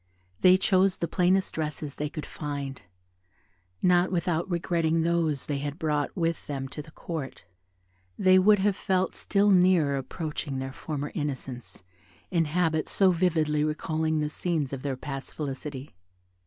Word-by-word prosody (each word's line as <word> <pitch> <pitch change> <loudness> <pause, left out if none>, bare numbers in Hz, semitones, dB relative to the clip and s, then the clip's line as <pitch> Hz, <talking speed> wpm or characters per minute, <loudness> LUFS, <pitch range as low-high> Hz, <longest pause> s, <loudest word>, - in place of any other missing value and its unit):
They 185 0 +7
chose 190 0 +3
the 170 - -2
plainest 185 +3 +2
dresses 150 -2 -3
they 150 0 -2
could 155 -1 -6
find, 140 -4 -5 1.0
not 180 0 +4
without 170 0 0
regretting 165 -2 +1
those 165 -4 0
they 145 -2 -2
had 145 +1 -4
brought 150 0 -1
with 165 -1 -1
them 135 -2 -3
to 150 - -5
the 155 - -14
Court; 155 - -6 0.7
they 185 0 +6
would 205 +3 +6
have 200 0 +2
felt 185 -1 0
still 205 0 +2
nearer 180 -6 +4
approaching 145 +1 -4
their 135 0 -4
former 145 0 -4
innocence, 130 - -5 0.5
in 170 -3 +2
habits 160 0 0
so 190 -2 +4
vividly 160 -4 +1
recalling 155 +1 0
the 150 - -1
scenes 155 -5 -1
of 135 - -4
their 135 -2 -3
past 135 0 -6
felicity. 140 -1 -5
155 Hz, 150 wpm, -27 LUFS, 145-180 Hz, 1.0 s, They